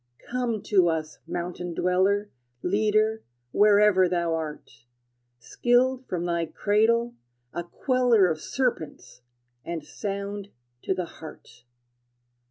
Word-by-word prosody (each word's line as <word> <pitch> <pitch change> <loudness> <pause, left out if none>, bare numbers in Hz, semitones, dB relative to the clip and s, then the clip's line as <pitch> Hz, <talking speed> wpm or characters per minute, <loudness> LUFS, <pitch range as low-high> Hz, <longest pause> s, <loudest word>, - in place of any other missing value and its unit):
Come 240 -4 -1
to 185 -4 +3
us, 160 -1 -3
mountain 175 0 -4
dweller, 195 +3 +1 0.3
Leader, 215 +3 +2 0.3
wherever 205 -2 +5
thou 170 -2 0
art, 150 -7 -6 0.5
Skilled 250 - +1
from 175 -1 -2
thy 170 -1 -1
cradle, 230 +6 +1 0.4
a 175 - -3
queller 245 0 +3
Of 160 -2 -2
serpents, 235 - -3 0.4
and 170 -3 -5
sound 200 +2 -5 0.3
to 190 - -1
the 180 -1 -2
heart! 125 -7 -13
195 Hz, 105 wpm, -26 LUFS, 170-220 Hz, 0.5 s, wherever